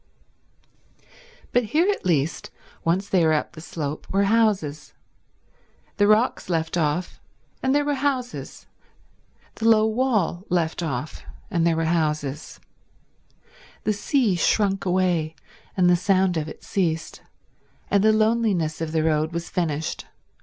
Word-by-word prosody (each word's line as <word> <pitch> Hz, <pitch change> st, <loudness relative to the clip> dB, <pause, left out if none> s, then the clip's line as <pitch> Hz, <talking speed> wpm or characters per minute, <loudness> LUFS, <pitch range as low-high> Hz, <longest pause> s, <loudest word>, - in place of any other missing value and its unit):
But 245 Hz, -1 st, +2 dB
here 310 Hz, -, +2 dB
at 400 Hz, -, -4 dB
least, 155 Hz, -2 st, 0 dB, 0.3 s
once 185 Hz, +4 st, 0 dB
they 185 Hz, -4 st, +2 dB
were 160 Hz, -1 st, +4 dB
up 150 Hz, -, -1 dB
the 160 Hz, -, -11 dB
slope, 155 Hz, -3 st, -5 dB
were 195 Hz, +1 st, +2 dB
houses. 200 Hz, -9 st, +1 dB, 1.0 s
The 205 Hz, -, +4 dB
rocks 215 Hz, -1 st, +2 dB
left 165 Hz, -1 st, -1 dB
off, 165 Hz, +1 st, -1 dB, 0.4 s
and 265 Hz, +1 st, +1 dB
there 290 Hz, 0 st, +2 dB
were 290 Hz, -, +1 dB
houses; 265 Hz, -3 st, -3 dB, 0.9 s
the 225 Hz, +1 st, +1 dB
low 220 Hz, -1 st, +5 dB
wall 220 Hz, -7 st, 0 dB
left 170 Hz, -1 st, 0 dB
off, 150 Hz, -2 st, -4 dB, 0.3 s
and 170 Hz, -3 st, +2 dB
there 165 Hz, -, +2 dB
were 165 Hz, 0 st, 0 dB
houses; 150 Hz, -3 st, -2 dB, 1.2 s
the 215 Hz, -, +1 dB
sea 225 Hz, +1 st, +1 dB
shrunk 195 Hz, +3 st, +1 dB
away, 175 Hz, -4 st, +1 dB, 0.4 s
and 180 Hz, -1 st, +4 dB
the 180 Hz, -, +6 dB
sound 190 Hz, 0 st, +2 dB
of 155 Hz, -1 st, -2 dB
it -, -, -11 dB
ceased, 165 Hz, -4 st, -2 dB, 0.7 s
and 200 Hz, 0 st, +3 dB
the 220 Hz, -, +6 dB
loneliness 215 Hz, -8 st, +1 dB
of 160 Hz, -1 st, -3 dB
the 160 Hz, -1 st, +1 dB
road 155 Hz, 0 st, +1 dB
was 170 Hz, 0 st, -4 dB
finished. 160 Hz, -3 st, -2 dB
180 Hz, 140 wpm, -24 LUFS, 160-215 Hz, 1.2 s, the